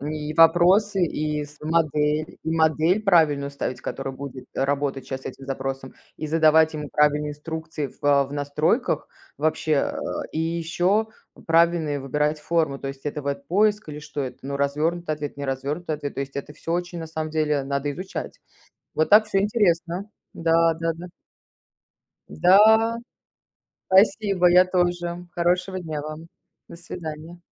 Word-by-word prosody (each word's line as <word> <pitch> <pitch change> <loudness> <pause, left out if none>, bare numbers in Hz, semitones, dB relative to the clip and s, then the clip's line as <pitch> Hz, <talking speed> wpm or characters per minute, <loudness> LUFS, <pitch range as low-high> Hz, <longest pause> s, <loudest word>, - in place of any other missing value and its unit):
И 150 +1 -4
вопросы, 180 +4 +5
и 150 -2 -2
с 150 +1 -16
модель, 155 -1 0
и 160 - -3
модель 160 +4 +2
правильную 155 -8 +3
ставить, 140 -2 -4
которая 135 0 -5
будет, 135 -1 -8
э, - - 0
работать 140 -1 -1
щас 130 0 -5
с - - -9
этим 135 - -8
запросом, 135 0 -4 0.2
и 155 - -5
задавать 160 0 +4
ему 150 -1 -5
правильные 150 0 +2
инструкции 160 0 -5
в, - - -20
э, 140 -1 +4
в 140 - -11
настройках 150 - 0 0.3
вообще. 155 0 0
Э, 140 - +1 0.4
и - - -3
ещё 170 +6 0 0.4
правильные 165 -3 +2
выбирать 150 +3 0
формы. 155 -4 0
То 135 - -5
есть 135 +1 -8
это 145 0 -3
веб-поиск 180 +9 0
или 150 - -7
что 150 -1 -5
это? 130 - -6
Ну, 140 +1 -4
развёрнутый 155 +4 -1
ответ, 145 -2 -6
неразвёрнутый 140 +4 -3
ответ. 145 -1 -6
То - - -4
есть 140 0 -6
это 140 +1 -5
всё 165 +2 -5
очень, 175 0 -2
на 165 - -5
самом 155 -1 -4
деле, 150 -3 0
надо 140 +1 -2
изучать. 185 +6 -7 0.5
Вот 155 - +1
так 215 +1 +7
всё 205 -2 0
интересно, 190 -3 0 0.2
да 165 0 +2
да 165 +1 -1
да. 175 +2 -9 1.2
Да. 220 - +5 0.9
Спасибо, 195 -2 +4
я 180 +1 +6
тоже. 175 -1 -1
Хорошего 180 +2 0
дня 155 -4 -5
вам. 155 +2 -8 0.4
До - - -11
свиданья. 165 -1 -8
155 Hz, 155 wpm, -24 LUFS, 145-175 Hz, 1.2 s, так